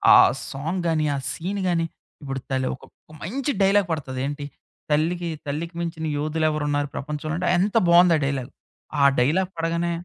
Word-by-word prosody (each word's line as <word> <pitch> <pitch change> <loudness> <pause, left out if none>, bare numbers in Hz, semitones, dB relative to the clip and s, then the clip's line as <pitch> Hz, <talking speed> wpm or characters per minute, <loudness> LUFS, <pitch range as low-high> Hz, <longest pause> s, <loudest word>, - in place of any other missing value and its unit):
ఆ - - +10 0.3
సాంగ్ 165 +7 -3
గాని, 155 -2 +1
ఆ - - -1
సీను 195 +4 -3
గాని, 165 -2 +1 0.4
ఇప్పుడు 135 -1 -4
తలే 130 -1 0
ఒక - - -21 0.3
ఒక - - -14
మంచి 270 - -2
డైలాగ్ 195 -1 +4
పడతది 135 -5 -3
ఏంటి? 145 0 -4 0.4
'తల్లికి 170 +4 +1 0.2
తల్లికి 165 +4 -4
మించిన 165 -2 -3
యోధులు 155 +2 0
ఎవరున్నారు 145 -1 0
ప్రపంచంలోంటే' 155 +5 -2
ఎంత 200 +5 +2
బావుంది 175 0 +7
ఆ - - -2
డైలాగు. 135 -2 -2 0.5
ఆ - - +5 0.2
డైలాగ్ 170 +9 +2
పడగానే 170 +1 0
160 Hz, 160 wpm, -24 LUFS, 145-175 Hz, 0.5 s, ఆ